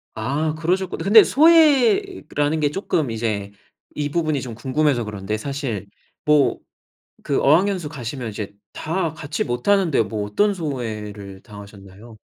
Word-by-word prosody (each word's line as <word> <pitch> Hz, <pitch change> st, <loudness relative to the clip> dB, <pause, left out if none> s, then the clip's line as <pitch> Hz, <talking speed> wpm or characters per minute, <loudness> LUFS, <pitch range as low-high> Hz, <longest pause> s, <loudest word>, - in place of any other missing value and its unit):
아 145 Hz, +8 st, -1 dB
그러셨구 180 Hz, +4 st, -1 dB
근데 215 Hz, +2 st, +7 dB
소외라는게 285 Hz, -, +3 dB
쪼끔 155 Hz, -, -1 dB
이제 110 Hz, -3 st, -3 dB, 0.4 s
이 145 Hz, -1 st, -2 dB
부분이 155 Hz, -3 st, -1 dB
좀 120 Hz, -3 st, -7 dB
궁금해서 130 Hz, 0 st, 0 dB
그런데 105 Hz, 0 st, -4 dB
사실 120 Hz, -6 st, -4 dB, 0.4 s
뭐 150 Hz, -2 st, +3 dB, 0.6 s
그 140 Hz, -, 0 dB
어학연수 175 Hz, +3 st, +2 dB
가시면 125 Hz, -3 st, -6 dB
이제 105 Hz, -1 st, -6 dB, 0.2 s
다 165 Hz, 0 st, -2 dB
같이 150 Hz, -1 st, -3 dB
못하는데 155 Hz, -, +1 dB
뭐 105 Hz, -1 st, -4 dB
어떤 205 Hz, -, +1 dB
소외를 105 Hz, -, -6 dB
당하셨나요? 100 Hz, +1 st, -13 dB
140 Hz, 290 characters per minute, -21 LUFS, 110-165 Hz, 0.6 s, 근데